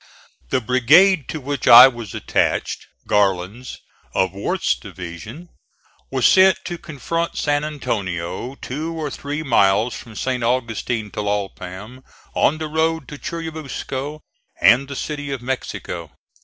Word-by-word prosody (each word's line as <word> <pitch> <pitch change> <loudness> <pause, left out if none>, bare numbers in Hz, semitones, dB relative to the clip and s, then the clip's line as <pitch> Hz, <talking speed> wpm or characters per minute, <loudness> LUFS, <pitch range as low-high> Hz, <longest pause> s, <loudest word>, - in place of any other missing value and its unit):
The 130 - +1
brigade 130 - +4
to 155 - -4
which 140 -1 -4
I 125 +2 +11
was 120 -6 -6
attached - - -1 0.2
Garland's, 100 +4 0 0.4
of 95 -1 +1
Worth's 100 -8 0
division 90 - -9 0.6
was 130 -2 0
sent 190 0 +6
to 175 -2 -5
confront 165 +3 -3
San 145 0 +1
Antonio, 110 - -3
two 155 +6 -5
or 150 -3 -3
three 145 +3 -4
miles 110 -3 +3
from 110 0 -10
St. 125 +1 -2
Augustin 115 -2 -1
Tlalpam, 105 +3 -4 0.3
on 155 - +2
the 155 0 -4
road 160 -1 0
to 145 - -9
Churubusco 155 -3 -5 0.4
and 120 +9 +5
the 140 - -6
City 145 +1 -4
of 135 -3 -4
Mexico. 90 - -4
130 Hz, 130 wpm, -21 LUFS, 105-150 Hz, 0.6 s, I